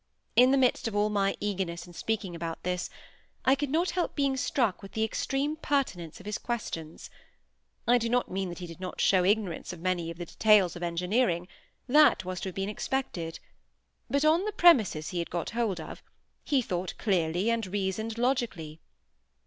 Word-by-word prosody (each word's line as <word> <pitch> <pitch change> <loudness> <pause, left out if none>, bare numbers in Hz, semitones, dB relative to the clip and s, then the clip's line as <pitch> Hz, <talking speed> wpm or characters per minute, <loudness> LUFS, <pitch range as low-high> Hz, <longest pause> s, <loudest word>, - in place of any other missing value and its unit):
In 250 +1 +7
the 275 - +4
midst 255 -3 +2
of 220 - -4
all 210 +1 +2
my 200 -1 +1
eagerness 185 -4 -3
in 175 - -14
speaking 200 -2 -3
about 165 -1 -5
this, 180 -1 -2 0.6
I 265 - +6
could 280 0 -1
not 335 +5 +1
help 355 0 -1
being 275 -2 +1
struck 245 -6 0
with 195 - -11
the 220 - 0
extreme 275 +6 -1
pertinence 260 - -2
of 190 - -14
his 210 0 -3
questions. 165 -9 -5 0.8
I 245 +1 +5
do 230 0 -1
not 245 +1 +1
mean 190 0 -2
that 175 - -7
he 180 - -6
did 165 0 -10
not 185 -1 -6
show 185 -2 +4
ignorance 200 -2 0
of 175 - -10
many 175 -1 -1
of 165 - -7
the 175 - -5
details 205 -1 +4
of 175 - -8
engineering: 180 +2 0 0.4
that 295 -7 +5
was 185 -1 -4
to 190 - -3
have 185 - -11
been 195 0 -2
expected; 205 -7 -3 0.7
but 280 +2 +1
on 325 +5 +4
the 425 - -1
premises 220 - +4
he 180 - -3
had 170 - -3
got 170 -1 -3
hold 225 -6 -1
of; 160 - -8 0.4
he 275 -4 +1
thought 180 -3 -3
clearly 180 +1 +1
and 230 -3 -1
reasoned 205 +3 -2
logically. 230 - -1
200 Hz, 190 wpm, -29 LUFS, 175-245 Hz, 0.8 s, In